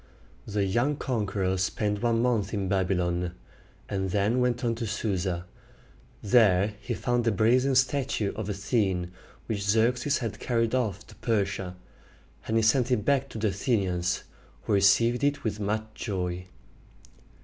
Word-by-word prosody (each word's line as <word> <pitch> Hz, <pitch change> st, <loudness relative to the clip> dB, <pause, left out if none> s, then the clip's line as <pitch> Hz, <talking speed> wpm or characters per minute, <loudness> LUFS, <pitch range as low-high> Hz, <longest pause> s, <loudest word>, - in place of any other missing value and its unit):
The 105 Hz, -1 st, 0 dB
young 120 Hz, +10 st, +1 dB
conqueror 100 Hz, -8 st, -1 dB
spent 105 Hz, +2 st, -1 dB
one 115 Hz, -1 st, +2 dB
month 110 Hz, -4 st, 0 dB
in 100 Hz, -2 st, -1 dB
Babylon, 90 Hz, -2 st, 0 dB, 0.5 s
and 95 Hz, -1 st, -2 dB
then 105 Hz, +6 st, +1 dB
went 125 Hz, 0 st, 0 dB
on 115 Hz, -, +2 dB
to 115 Hz, 0 st, -4 dB
Su´sa. 95 Hz, -5 st, -2 dB, 0.8 s
There 105 Hz, -3 st, +4 dB
he -, -, -3 dB
found 120 Hz, -2 st, 0 dB
the 115 Hz, -, +2 dB
brazen 125 Hz, +6 st, +3 dB
statue 130 Hz, -5 st, +1 dB
of 105 Hz, -2 st, -5 dB
Athene 95 Hz, -3 st, 0 dB, 0.3 s
which 105 Hz, -3 st, -3 dB
Xerxes 120 Hz, +7 st, +2 dB
had 115 Hz, -4 st, -4 dB
carried 115 Hz, -2 st, 0 dB
off 110 Hz, -5 st, -1 dB
to -, -, -15 dB
Persia; 100 Hz, -5 st, -1 dB, 0.7 s
and 110 Hz, -, +1 dB
he 115 Hz, -, +3 dB
sent 120 Hz, +3 st, +3 dB
it 110 Hz, -5 st, +1 dB
back 140 Hz, 0 st, +2 dB
to -, -, -8 dB
the 110 Hz, -1 st, +1 dB
Athenians, 95 Hz, -4 st, 0 dB, 0.4 s
who 110 Hz, -, -1 dB
received 115 Hz, +6 st, +4 dB
it 145 Hz, 0 st, +1 dB
with 105 Hz, -2 st, -2 dB
much 105 Hz, +1 st, -1 dB
joy. 90 Hz, -4 st, -3 dB
105 Hz, 150 wpm, -27 LUFS, 95-120 Hz, 0.8 s, There